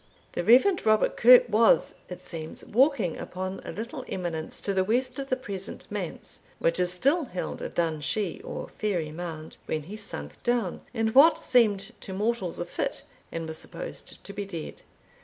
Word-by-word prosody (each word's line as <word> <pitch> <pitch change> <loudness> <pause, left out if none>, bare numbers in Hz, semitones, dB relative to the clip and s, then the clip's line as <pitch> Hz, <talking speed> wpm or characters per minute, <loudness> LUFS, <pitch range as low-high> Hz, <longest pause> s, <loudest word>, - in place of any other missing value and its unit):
The - - -2
Rev. 260 - +5
Robert 215 -1 +3
Kirke 245 +1 +8
was, 225 0 +4 0.2
it 180 - -8
seems, 160 -2 -5
walking 250 - +2
upon 185 +1 -5
a - - -6
little 240 +5 -6
eminence 170 -4 -3
to 200 - -1
the 190 -1 +2
west 250 +5 0
of 275 0 -5
the 255 - +2
present 200 -6 -6
manse, 200 -5 -4 0.2
which 165 +2 +2
is 180 0 +3
still 275 - +2
held 180 -7 -5
a - - -3
Dun 160 -3 -1
Shie, 210 - -1
or - - -6
fairy 175 -8 -1
mound, 160 -1 -7
when 155 -1 -2
he 190 +8 -8
sunk 75 - -7
down, 240 -7 0
in 225 -2 0
what 280 +8 +7
seemed 215 -4 +2
to 190 - -6
mortals 205 -2 -1
a 175 - -3
fit, - - -3 0.3
and 165 -1 -4
was 160 0 -6
supposed - - -6
to 200 - -8
be 205 +1 -3
dead. 175 -6 -7
200 Hz, 180 wpm, -27 LUFS, 175-240 Hz, 0.3 s, Kirke